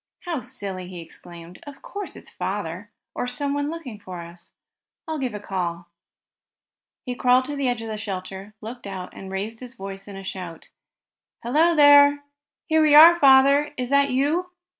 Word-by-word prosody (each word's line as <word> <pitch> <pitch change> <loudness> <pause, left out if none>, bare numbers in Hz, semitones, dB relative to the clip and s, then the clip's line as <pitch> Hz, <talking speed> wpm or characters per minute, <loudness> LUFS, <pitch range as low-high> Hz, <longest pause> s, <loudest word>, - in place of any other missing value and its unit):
"How 335 -7 -4
silly!" 200 -8 -6
he 180 -1 -9
exclaimed, 170 +1 -12
"Of 285 -1 -11
Course 405 -1 -7
it's - - -11
father, - - -5 0.2
or - - -3
someone 285 +3 -2
looking 285 -10 -7
for 185 -3 -8
us. 170 +1 -13 0.6
I'll 315 -1 -3
give 255 -5 -3
a - - -5
call." 175 -3 -4 1.2
He 250 - -3
crawled 250 +1 +3
to 290 - -5
the 280 -2 -1
edge 245 -2 -1
of - - -6
the 215 -1 -5
shelter, 195 0 -7
looked 230 0 -8
out, 185 -2 -7
and 190 - -10
raised 210 +4 -4
his 250 0 -10
voice 195 0 -8
in 200 - -9
a 195 - -8
shout: 180 -4 -8 0.7
"Hello 315 +8 +3
there! 285 -1 +6 0.4
Here 315 -1 +2
we 305 -1 +5
are! 335 +3 +9
Father, 280 +1 +5
is 250 0 -4
that 280 0 +4
you?" 295 +8 0
245 Hz, 175 wpm, -23 LUFS, 195-285 Hz, 1.2 s, are